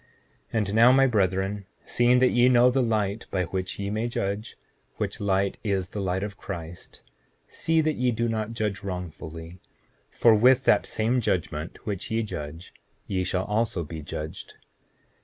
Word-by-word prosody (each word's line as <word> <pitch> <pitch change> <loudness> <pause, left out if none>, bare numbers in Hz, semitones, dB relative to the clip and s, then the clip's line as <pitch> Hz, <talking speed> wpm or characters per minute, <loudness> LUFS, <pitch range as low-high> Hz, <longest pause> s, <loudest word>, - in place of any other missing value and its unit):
7:18 - - -27
And 105 -3 0
now, 115 +3 +7
my 135 +1 +5
brethren, 100 -3 0 0.2
seeing 120 +1 +3
that 130 0 +4
ye 120 +1 +5
know 125 0 +5
the 135 +1 +2
light 110 -2 -1
by 95 -2 0
which 95 +1 -4
ye 100 0 -3
may 110 +3 -1
judge, 110 -2 -3 0.4
which - - -3
light 100 -1 0
is 95 -4 -1
the 105 - -4
light 95 0 -1
of 105 -1 -6
Christ, 85 -2 -8 0.5
see 165 0 +1
that 155 -1 0
ye 125 0 +2
do 115 0 0
not 110 0 -2
judge 105 -4 -2
wrongfully; 85 -2 -7 0.5
for 115 - +4
with 125 +4 +5
that 105 - +4
same 120 +3 0
judgment 85 -6 -3
which 100 -4 -4
ye 115 +1 0
judge 85 -4 -7 0.3
ye 95 -2 -1
shall 90 +1 -1
also 105 -4 0
be 80 +1 -7
judged. 75 +1 -7
100 Hz, 170 wpm, -26 LUFS, 95-115 Hz, 0.5 s, now